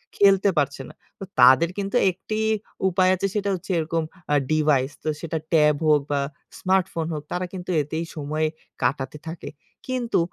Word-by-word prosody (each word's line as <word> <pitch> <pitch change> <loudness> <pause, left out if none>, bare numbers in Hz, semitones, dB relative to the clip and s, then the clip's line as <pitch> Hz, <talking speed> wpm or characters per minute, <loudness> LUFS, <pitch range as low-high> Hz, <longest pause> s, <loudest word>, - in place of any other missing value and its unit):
খেলতে 195 0 +5
পারছে 140 -1 0
না। - - -13 0.3
তো - - -6 0.2
তাদের 130 +7 +7
কিন্তু 200 +3 -3 0.2
একটিই 215 +4 -3 0.4
উপায় 185 0 +3
আছে 190 +2 -1
সেটা 200 -1 0
হচ্ছে 185 +2 -7
এরকম 165 +1 -1 0.3
আ - - +5 0.2
ডিভাইস 150 -3 +2
তো 155 - -1
সেটা 165 -1 -3 0.2
ট্যাব 150 -2 +5
হোক 150 -1 +5
বা 140 - +2 0.4
স্মার্টফোন 185 -3 +1
হোক 150 -1 -4
তারা 180 +1 -1
কিন্তু 180 -1 -7
এতেই 160 +3 -3
সময় 155 +1 -1 0.4
কাটাতে 135 +3 -1
থাকে। 165 0 -6 0.4
কিন্তু 245 -6 0
165 Hz, 165 wpm, -24 LUFS, 150-190 Hz, 0.4 s, তাদের